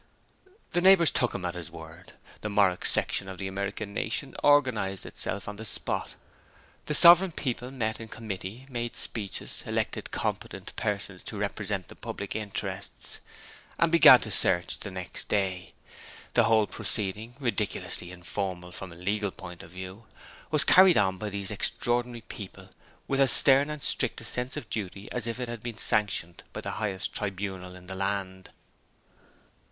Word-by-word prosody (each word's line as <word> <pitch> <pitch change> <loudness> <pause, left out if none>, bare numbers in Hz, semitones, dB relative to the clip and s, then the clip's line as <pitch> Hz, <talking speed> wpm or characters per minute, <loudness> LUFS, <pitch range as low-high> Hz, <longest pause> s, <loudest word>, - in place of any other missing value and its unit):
The 175 - +1
neighbors 185 -3 +7
took 125 - +1
him 90 - -4
at 85 - -2
his 90 -2 -7
word. 80 +3 -12 0.3
The 105 - -3
Morwick 100 -3 +2
section 95 - +1
of 95 - -7
the 95 - -4
American 100 +1 -4
nation - - -2
organized 125 -10 +3
itself 100 - -4
on 105 0 -6
the 110 - -6
spot. 110 - -2 0.7
The 150 - +1
sovereign 175 +3 +9
people 125 -3 -3
met 110 -4 -2
in 115 - -7
committee, 110 +2 -6
made 120 -3 -3
speeches, 105 -4 -5
elected - - -2
competent - - -4
persons 100 -3 -2
to 105 - -5
represent 100 -2 -2
the - - -12
public 100 -1 -6
interests, 100 -3 -5 0.6
and 165 -1 +3
began 170 -1 +10
the - - -4
search 85 0 +3
the 100 - -6
next 95 -1 -7
day. 95 -3 -1 0.6
The - - +5
whole 110 -1 +4
proceeding, 105 +3 -2
ridiculously 110 -7 -2
informal 90 0 -4
from 95 0 -7
a - - -11
legal 100 +4 -1
point 90 -2 -10
of - - -12
view, 95 +4 -9 0.4
was 155 0 +3
carried 185 0 +7
on 95 -2 +2
by 105 - -3
these 100 -1 -4
extraordinary 120 0 -1
people 100 -3 -9 0.4
with 135 - 0
as 135 -2 +6
stern 140 +3 +6
and 150 -2 -5
strict 130 - 0
a 110 - -9
sense 125 +2 -1
of 115 - -6
duty 100 -1 -5
as 120 -1 -3
if 115 +2 -3
it 125 - -3
had 120 -2 -6
been 120 -1 -6
sanctioned 95 -7 +1
by - - -5
the - - -3
highest 100 -3 -2
tribunal 95 -2 -4
in 90 0 -13
the 95 - -7
land. 95 -1 -3
105 Hz, 165 wpm, -28 LUFS, 95-120 Hz, 0.7 s, began